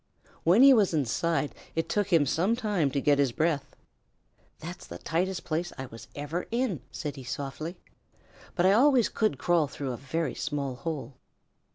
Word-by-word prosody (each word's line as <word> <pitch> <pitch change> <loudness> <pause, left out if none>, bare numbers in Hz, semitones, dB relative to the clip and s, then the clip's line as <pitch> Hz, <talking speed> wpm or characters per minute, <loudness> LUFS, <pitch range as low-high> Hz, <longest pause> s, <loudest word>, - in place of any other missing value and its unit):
When 185 +10 +6
he 275 0 +9
was 205 -8 +3
inside 150 +3 0 0.2
it 165 - 0
took 205 -2 0
him 165 -4 +5
some 185 - +1
time 205 - 0
to 140 - -1
get 145 0 +3
his 140 -3 +3
breath. 145 0 -1 0.8
"That's 175 +3 -8
the 85 - -7
tightest 175 - -1
place 170 +2 -2
I 130 - -4 0.3
ever 145 +4 -3
was - - -8
in," 235 - -1
said 150 -4 -5
he 135 - -8
softly, 140 +7 -5 0.8
"but 175 - +2
I 190 - +6
always 250 +2 +5
could 215 -11 0
crawl 170 +1 +2
through 140 -1 -5
a 120 - -4
very 160 +6 -2
small 140 -3 -3
hole." 145 -1 -5
165 Hz, 175 wpm, -28 LUFS, 140-185 Hz, 0.8 s, he